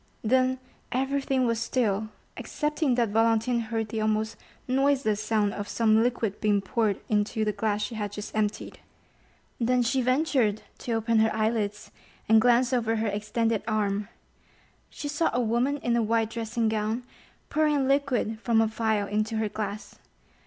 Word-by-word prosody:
Then 255 +3 +2 0.3
everything 270 0 0
was 230 -1 0
still, 220 -3 0 0.3
excepting 300 -3 -1
that 235 -3 +1
Valentine 225 +2 +2
heard 225 -1 -3
the 220 0 -3
almost 215 0 0 0.3
noiseless 260 -5 +1
sound 215 -2 +1
of 205 -2 -5
some 220 -1 +3
liquid 230 -4 -1
being 210 -1 +3
poured 210 0 0
into 215 +1 0
the 210 - +1
glass 210 0 -1
she 235 - -4
had 210 -2 -3
just 210 +1 -7
emptied. 215 -1 -2 0.8
Then 250 +1 +2
she 260 +3 +1
ventured 255 -5 +1 0.2
to 235 - -3
open 225 0 +2
her 220 0 +3
eyelids, 215 -1 -1 0.4
and 220 0 +6
glance 245 +2 +3
over 225 -2 +1
her 220 -1 0
extended 215 +2 -1
arm. 205 -2 0 0.8
She 290 - -6
saw 295 +3 +1
a - - +2
woman 245 +4 +1
in 240 -4 0
a 235 - +2
white 225 0 +1
dressing 230 0 -1
gown 220 +2 -1 0.5
pouring 305 -1 +2
a 275 - +1
liquor 265 -5 0
from 230 -2 +3
a 225 - +4
phial 220 -2 0
into 215 +2 -1
her 220 -1 0
glass. 210 0 -6
225 Hz, 160 wpm, -27 LUFS, 215-245 Hz, 0.8 s, and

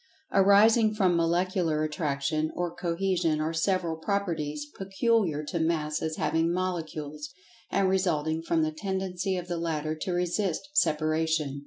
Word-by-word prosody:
Arising 215 +3 +5
from 185 -4 +3
Molecular 170 -1 +1
Attraction, 155 0 -1
or 175 -1 -2
Cohesion, 170 -2 0
are 155 +1 -1
several 170 -1 0
"Properties" 160 -6 -2
peculiar 195 -5 0
to 165 +3 -3
Masses 160 -1 -1
having 165 +1 +1
Molecules, 155 -5 -3 0.4
and 195 -1 +2
resulting 165 -4 +1
from 165 -1 +1
the 155 - 0
tendency 190 +2 -2
of 180 0 -5
the 175 -1 -2
latter 155 -2 -2
to 160 +4 -4
resist 180 - -1
separation. 155 - +1
165 Hz, 130 wpm, -28 LUFS, 155-185 Hz, 0.4 s, Arising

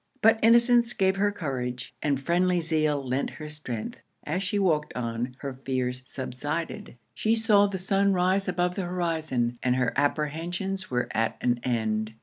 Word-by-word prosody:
But 225 0 +6
innocence 235 +1 +5
gave 190 -2 +2
her 205 +1 +2
courage, 125 -9 -4
and 140 -3 +1
friendly 175 +4 +2
zeal 155 -4 0
lent 130 +2 0
her 155 - -7
strength. 140 -8 -5 0.2
As 175 +5 -2
she 195 +1 -1
walked 160 -6 +1
on, 120 +1 -3
her 140 -2 -4
fears 125 -1 -1
subsided. 145 +2 -4 0.2
She 220 +1 +1
saw 215 -3 +4
the 195 -1 -3
sun 195 +2 +2
rise 185 +2 +2
above 180 0 0
the 185 0 -3
horizon, 160 -9 -1
and 125 -1 +2
her 125 -2 +1
apprehensions 165 +7 -1
were 125 -1 0
at 115 +1 0
an 120 -1 +1
end. 110 -3 -1
155 Hz, 160 wpm, -27 LUFS, 125-190 Hz, 0.2 s, But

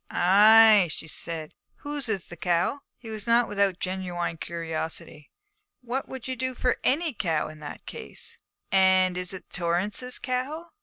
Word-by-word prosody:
'Ay,' 210 +1 +6
she 160 - -7
said, 160 0 -1
'and - - -41
whose 290 -4 -4
is 195 -5 -2
the 175 - -10
cow?' 175 - 0 0.2
He 225 -3 -10
was 215 +1 -5
not 235 0 +4
without 200 -1 +2
a - - -40
genuine 180 -3 -3
curiosity. 160 -2 -6 0.5
'What 250 +2 -4
would 265 -2 -8
you 260 - -2
do 255 +1 -3
for 250 0 0
any 310 +2 +1
cow 165 -8 -1
in 155 - -12
that 150 - -9
case?' - - -8 0.3
'And 190 -1 +4
is 180 0 -3
it 190 - -9
Torrance's 185 +8 -1
cow?' 285 +7 -4
195 Hz, 165 wpm, -26 LUFS, 175-250 Hz, 0.5 s, Ay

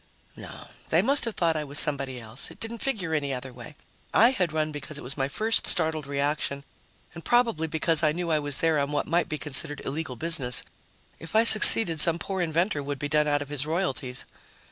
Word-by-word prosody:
No, - - -12 0.2
they 165 +4 +3
must 275 +4 +1
have 230 - -5
thought 165 -2 0
I 155 - -2
was 145 0 -5
somebody 140 -4 -2
else. 115 +2 -7
It - - -15
didn't 225 +1 -6
figure 200 -12 -2
any 145 -3 -1
other 130 0 -6
way. 125 +4 -12 0.4
I 230 +4 +6
had 180 -10 -2
run 155 0 -2
because 150 0 -7
it - - -9
was 130 +3 -4
my 135 -1 -1
first 220 +10 0
startled 160 -3 -2
reaction 140 0 -2 0.5
and 165 - -10
probably 230 -10 +1
because 160 +1 0
I 155 -2 +2
knew 170 +1 -4
I 155 - +2
was 145 -2 -4
there 160 -2 +1
on 140 +1 -2
what 145 - -1
might 170 +1 0
be 155 - -3
considered 145 0 0
illegal 140 -2 -5
business; 135 -4 +2 0.6
if 165 +5 -10
I 220 - +5
succeeded, 215 -6 +8
some 165 +2 +2
poor 190 +2 -4
inventor 170 0 -1
would 140 0 -5
be 145 +1 -5
done 150 +1 +1
out 145 -1 0
of 145 - -16
his 145 0 -2
royalties. 140 -7 -3
155 Hz, 215 wpm, -25 LUFS, 140-170 Hz, 0.6 s, succeeded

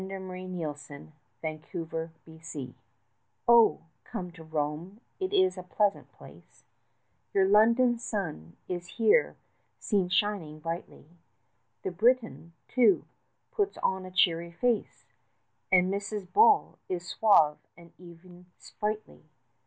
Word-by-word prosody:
AN 190 - -6
INVITATION 180 -7 -7 0.6
TO 170 - -3
ROME 160 -4 -8 0.7
Oh, 235 -2 +6 0.2
come 180 -1 -6
to 165 -1 -13
Rome, 160 +5 -4 0.2
it 375 0 -2
is 375 - +2
a - - -5
pleasant 200 +3 -1
place, - - -17 0.7
Your 190 -1 +4
London 230 +4 +4
sun 160 - -5
is 175 -1 -4
here 435 - +3 0.4
seen 195 -4 0
shining 180 -5 -1
brightly; 165 0 -6 0.8
The 190 - -2
Briton, 225 -3 +1
too, 255 +9 +3 0.5
puts 410 -5 -1
on 190 0 0
a - - -8
cheery 170 -2 +1
face, 230 +4 -1 0.7
And 185 +1 +4
Mrs. 200 -1 -5
Bull 435 -1 +4
is 180 -1 -3
suave 160 -10 +4 0.2
and 170 0 -16
even 175 0 -15
sprightly. 215 +1 -5
185 Hz, 115 wpm, -29 LUFS, 165-215 Hz, 0.8 s, Oh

